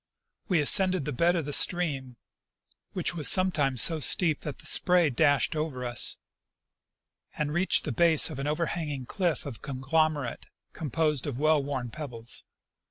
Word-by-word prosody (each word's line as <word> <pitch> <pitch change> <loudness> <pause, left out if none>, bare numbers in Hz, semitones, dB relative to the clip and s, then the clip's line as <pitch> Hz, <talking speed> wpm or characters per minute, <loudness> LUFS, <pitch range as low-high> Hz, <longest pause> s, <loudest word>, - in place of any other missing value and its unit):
We 180 -5 +1
ascended 185 +1 +3
the 150 - -3
bed 170 +7 +1
of 165 -4 -2
the 145 - -4
stream, 140 -10 +2 0.8
which 180 -1 -3
was 160 -4 +3
sometimes 150 - +2
so 165 -2 +1
steep 155 +1 +3
that 145 -4 -7
the - - -15
sjDray 175 -7 +2
dashed 145 +5 +2
over 150 -5 -4
us, 120 0 +1 1.2
and 150 -1 -2
reached 180 +4 +1
the 150 - -4
base 160 +4 +3
of - - -7
an 140 - -4
overhanging 150 -3 -3
cliff 175 +2 -2
of 135 -6 -8
conglomerate 145 0 -2 0.3
com 155 -3 -6
posed 150 -1 -1
of 135 -4 -5
well 155 +1 +2
worn 135 -4 -5
pebbles. 120 -4 -3
150 Hz, 160 wpm, -27 LUFS, 135-170 Hz, 1.2 s, ascended